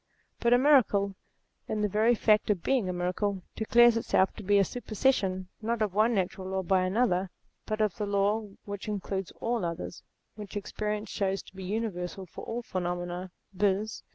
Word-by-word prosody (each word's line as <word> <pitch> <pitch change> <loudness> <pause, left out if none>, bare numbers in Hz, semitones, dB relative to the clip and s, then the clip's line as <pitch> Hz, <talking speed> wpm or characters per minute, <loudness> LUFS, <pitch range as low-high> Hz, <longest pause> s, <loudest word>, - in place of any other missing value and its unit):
But 235 - +2
a 245 - +7
miracle, 245 -8 +4 0.5
in 215 - -1
the 210 - +2
very 220 +4 +3
fact 215 -1 +3
of 195 -5 +1
being 245 -9 +1
a - - -1
miracle, 185 +2 -1
declares 235 +1 +5
itself 190 -4 +2
to - - -9
be 205 0 +3
a 200 - +6
super 235 +2 -7
session 190 -7 +1
not 225 0 0
of 205 -4 -2
one 220 +3 +3
natural 185 0 -2
law 190 0 -1
by 185 +1 +3
another, 190 -2 +1 0.4
but 215 0 -1
of 210 -3 +1
the 210 - -2
law 205 +2 +1 0.2
which 205 +1 -6
includes 195 -2 -3
all 235 -2 -1
others, 170 +1 -4 0.3
which 210 -1 -7
experience 210 +1 -3
shows 195 -1 -1
to - - -17
be 190 -1 -7
universal 190 -3 -3
for 175 - -10
all 235 +1 -4
phenomena, 175 -1 -3 0.2
viz. 205 +2 0
205 Hz, 180 wpm, -29 LUFS, 185-220 Hz, 0.5 s, a